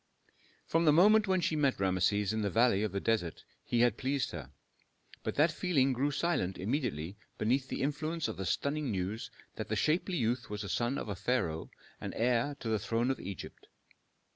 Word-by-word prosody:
From 165 +1 +2
the 150 - +7
moment 210 +7 +6
when 190 -1 +2
she 160 - 0
met 140 -6 +2
Rameses 95 +2 +1
in 110 - -1
the 100 - 0
valley 115 -1 +3
of 105 -2 -1
the 100 - -1
desert 100 -6 -1 0.2
he 120 - +1
had 120 0 +3
pleased 135 0 0
her, - - -7 0.7
but - - -3
that 155 +3 +4
feeling 145 -7 +2
grew 135 +4 +1
silent 145 - 0
immediately 100 - -2 0.2
beneath 130 +5 +1
the - - -3
influence 155 +2 -1
of 110 - -4
the 95 - -3
stunning 140 - -1
news 100 +2 -3 0.3
that - - -4
the - - -1
shapely 175 +3 +1
youth 120 0 0
was 105 0 -4
a 100 - -5
son 120 +9 0
of - - -3
the 100 - -4
pharaoh 95 -6 -1 0.3
and - - -5
heir 125 +4 +1
to 115 - -4
the 110 -1 +1
throne 115 +5 0
of 135 - -3
Egypt. 95 -3 -8
120 Hz, 195 wpm, -32 LUFS, 105-145 Hz, 0.7 s, the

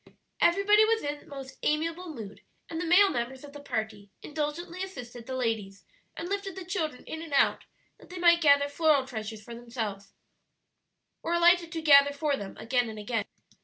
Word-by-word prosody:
Everybody 395 +4 +5
was 445 +1 +2
in 290 0 -5
most 275 -2 -9
amiable 330 +4 -1
mood, 220 -9 -9 0.3
and 325 0 -4
the 350 - -3
male 390 +4 +6
members 245 +3 -4
of 285 -1 -11
the 290 - -9
party 220 -6 -4
indulgently 315 +4 -4
assisted 245 -11 -8
the 260 - -4
ladies, 220 -6 -3 0.3
and 335 - -4
lifted 395 -1 -3
the 380 -2 -7
children 320 -8 -3
in 320 - -7
and 325 -3 -8
out - - +3 0.3
that - - -17
they 365 - -8
might 340 -1 +5
gather 285 -2 +5
floral 290 -2 +2
treasures 220 -3 -6
for 235 - -10
themselves, 225 -5 -6 1.1
or 340 - -1
alighted 345 0 +4
to 325 -1 -4
gather 285 -2 +7
for 285 0 0
them 200 -7 -8
again 245 0 0
and 220 - -8
again. 210 0 -2
285 Hz, 180 wpm, -28 LUFS, 235-340 Hz, 1.1 s, gather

